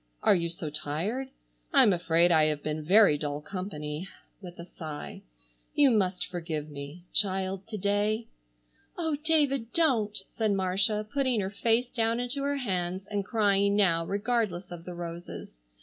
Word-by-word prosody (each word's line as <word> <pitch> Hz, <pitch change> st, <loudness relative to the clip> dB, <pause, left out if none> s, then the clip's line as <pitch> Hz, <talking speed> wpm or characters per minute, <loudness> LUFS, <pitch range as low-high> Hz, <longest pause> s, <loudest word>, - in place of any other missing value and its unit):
"Are -, -, +6 dB
you 170 Hz, -3 st, 0 dB
so 165 Hz, -2 st, -5 dB
tired? 165 Hz, -, -2 dB, 0.4 s
I'm 265 Hz, -, +6 dB
afraid 170 Hz, 0 st, +3 dB
I 160 Hz, -2 st, +5 dB
have 150 Hz, -1 st, -1 dB
been 155 Hz, 0 st, -3 dB
very 185 Hz, -3 st, +5 dB
dull 145 Hz, -1 st, -3 dB
company," 155 Hz, -2 st, -5 dB, 0.3 s
with 180 Hz, -2 st, -10 dB
a 170 Hz, -, -8 dB
sigh. 155 Hz, -4 st, -8 dB, 0.5 s
"You 285 Hz, -3 st, +6 dB
must 185 Hz, -5 st, +1 dB
forgive 160 Hz, -4 st, -5 dB
me—child, 185 Hz, +6 st, -2 dB
to 220 Hz, -1 st, -5 dB
day." 205 Hz, +3 st, 0 dB, 0.7 s
"Oh, 320 Hz, -3 st, 0 dB
David, 280 Hz, -7 st, +2 dB
don't," 235 Hz, -11 st, +2 dB
said 220 Hz, -3 st, 0 dB
Marcia 195 Hz, +3 st, +1 dB
putting 260 Hz, -5 st, +2 dB
her 190 Hz, 0 st, -3 dB
face 230 Hz, +4 st, +1 dB
down 230 Hz, 0 st, +1 dB
into 245 Hz, +3 st, -1 dB
her 285 Hz, 0 st, 0 dB
hands 185 Hz, -6 st, -2 dB
and 205 Hz, -1 st, -1 dB
crying 200 Hz, -1 st, +2 dB
now 170 Hz, -5 st, +3 dB
regardless 200 Hz, -2 st, -1 dB
of 170 Hz, -1 st, -8 dB
the 180 Hz, -, -7 dB
roses. 170 Hz, -, -8 dB
195 Hz, 150 wpm, -28 LUFS, 170-225 Hz, 0.7 s, Are